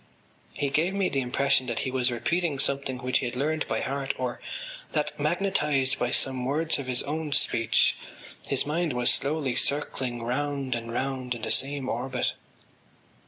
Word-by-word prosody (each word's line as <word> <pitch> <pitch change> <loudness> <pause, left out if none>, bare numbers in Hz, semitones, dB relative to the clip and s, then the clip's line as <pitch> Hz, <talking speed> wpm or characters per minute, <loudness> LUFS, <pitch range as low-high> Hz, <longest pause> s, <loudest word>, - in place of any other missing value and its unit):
He 140 -1 -1
gave 170 +7 +2
me 195 -2 +2
the 135 - 0
impression 130 +1 +2
that 120 -2 -1
he 130 - -2
was 130 -1 +2
repeating 160 +5 0
something 135 -1 0
which 125 0 +1
he 125 - -1
had 120 - -5
learned 155 +4 0
by - - -1
heart 135 0 -2
or 125 -1 -3 0.5
that, - - 0
magnetised 150 -9 +1
by 120 - +1
some 130 0 +1
words 150 +4 +1
of 135 - -5
his 125 -1 +1
own 150 +1 -3
speech, 115 -4 +3 0.5
his - - 0
mind 160 0 0
was 125 0 +4
slowly 140 -2 0
circling 130 -4 0
round 135 +2 -1
and 115 -1 -4
round 130 0 -2
in 115 - -9
the - - 0
same 135 -1 +1
orbit. 125 +2 -1
135 Hz, 170 wpm, -27 LUFS, 125-145 Hz, 0.5 s, was